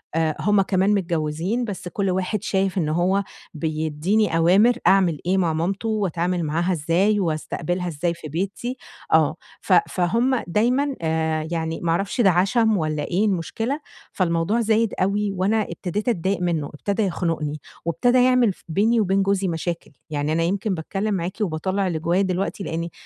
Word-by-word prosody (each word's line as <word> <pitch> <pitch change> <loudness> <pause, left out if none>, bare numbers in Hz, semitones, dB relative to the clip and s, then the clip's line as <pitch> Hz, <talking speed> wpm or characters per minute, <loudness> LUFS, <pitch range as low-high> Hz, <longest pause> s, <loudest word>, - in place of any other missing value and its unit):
آآ، 160 -2 +1
هُم 205 0 +3
كمان 195 +1 +2
متجوزين، 170 +5 -1
بس 190 -4 -6
كُلّ 195 +1 -1
واحد 190 +2 -1
شايف 190 -1 0
إن 155 -4 +1
هو 185 +5 +1 0.3
بيديني 160 +5 0
أوامر 195 +9 +4
أعمل 185 -5 +4
إيه 185 +2 +2
مع 170 -4 +1
مامتُه، 190 +7 -1
وأتعامل 180 -4 -1
معاها 170 +4 0
إزاي، 175 +7 +2
وأستقبلها 175 +1 -2
إزاي 170 +2 -1
في 165 -2 -9
بيتي، 200 - -3 0.4
آه، - - +4 0.3
ف - - +1 0.2
فهُم 230 +8 +1
دايمًا 250 +9 +1
آآ، 160 -1 0
يعني 160 -1 -2
ما 170 - 0
أعرَفش 195 +8 0
ده 195 - +6
عَشَم 210 +4 +2
والّا 155 -2 -1
إيه 185 +7 0
المُشكلة، 225 - -1 0.3
فالموضوع 170 +4 0
زايد 225 0 +2
أوي، 200 +1 +1
وأنا 195 +4 +1
ابتديت 205 +6 -3
أتضايق 190 -2 0
منه، 165 -5 -1
ابتدى 200 +8 -1
يَخنُقني، 165 -5 -2 0.3
وابتدى 245 +9 +3
يعمل 250 -5 +4
ف - - -25
بيني 220 +7 +2
وبين 195 -1 +2
جوزي 195 0 +1
مشاكل. 170 0 -3 0.2
يعني 150 0 -1
أنا 165 +1 +1
يمكن 195 +3 0
باتكلم 195 +5 -2
معاكِ 180 0 -2
وباطَلَّع 190 +2 -1
اللي 160 -3 -2
جوايا 175 +4 +1
دلوقتي، 190 +1 -2
لإني 165 +1 -3
185 Hz, 160 wpm, -23 LUFS, 165-205 Hz, 0.4 s, ده